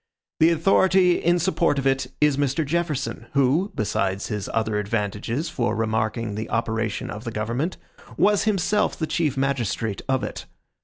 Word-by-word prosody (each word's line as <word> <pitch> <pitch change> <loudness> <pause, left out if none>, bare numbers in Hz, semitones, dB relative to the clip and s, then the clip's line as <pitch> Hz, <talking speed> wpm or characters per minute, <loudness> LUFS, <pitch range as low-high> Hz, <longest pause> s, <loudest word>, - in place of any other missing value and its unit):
The 160 - +6
authority 180 +2 +4
in 175 +1 +3
support 170 -3 +1
of 135 - -1
it 135 -1 +1
is 150 -2 +4
Mr. 145 +2 0
Jefferson, 155 -2 -2
who, 140 +9 +2
besides 100 -2 -1
his 105 -2 -3
other 110 -2 0
advantages 105 - -2
for 120 -9 -1
remarking 110 0 -1
the 110 +2 -5
operation 110 -1 -2
of 105 +2 -7
the 120 - -4
government, 115 +10 -2 0.4
was 205 0 +3
himself 210 0 +1
the 160 - -1
chief 155 -4 -1
magistrate 120 -6 -1
of 130 -1 +1
it. - - -6
135 Hz, 155 wpm, -24 LUFS, 110-165 Hz, 0.4 s, The